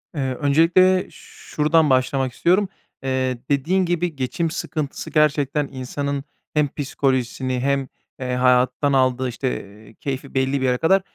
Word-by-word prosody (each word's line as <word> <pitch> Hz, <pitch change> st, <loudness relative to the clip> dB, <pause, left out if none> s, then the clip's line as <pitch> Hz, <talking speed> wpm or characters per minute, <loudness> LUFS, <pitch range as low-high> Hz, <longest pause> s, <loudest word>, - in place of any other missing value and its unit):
Eee, 145 Hz, -, -2 dB
öncelikle 165 Hz, +7 st, +4 dB
şuradan 155 Hz, +1 st, 0 dB
başlamak 130 Hz, 0 st, +1 dB
istiyorum: 185 Hz, +6 st, +2 dB, 0.3 s
Eee, 130 Hz, -1 st, 0 dB
dediğin 165 Hz, +7 st, +2 dB
gibi 175 Hz, -1 st, -1 dB
geçim 150 Hz, +5 st, -2 dB
sıkıntısı, 155 Hz, -3 st, -4 dB
gerçekten 150 Hz, -2 st, +2 dB
insanın 140 Hz, +2 st, -3 dB, 0.3 s
hem 150 Hz, -2 st, +2 dB
psikolojisini 130 Hz, -2 st, -1 dB
hem, 135 Hz, +1 st, 0 dB, 0.3 s
eee, 125 Hz, -1 st, -3 dB
hayattan 125 Hz, +3 st, +3 dB
aldığı, 130 Hz, -1 st, +2 dB
işte, 125 Hz, +2 st, -3 dB, 0.2 s
eee, 105 Hz, +2 st, -16 dB
keyfi 135 Hz, 0 st, -5 dB
belli 135 Hz, +1 st, +1 dB
bir -, -, +1 dB
yere 125 Hz, -1 st, +2 dB
kadar 190 Hz, +7 st, +3 dB
140 Hz, 135 wpm, -22 LUFS, 130-155 Hz, 0.3 s, öncelikle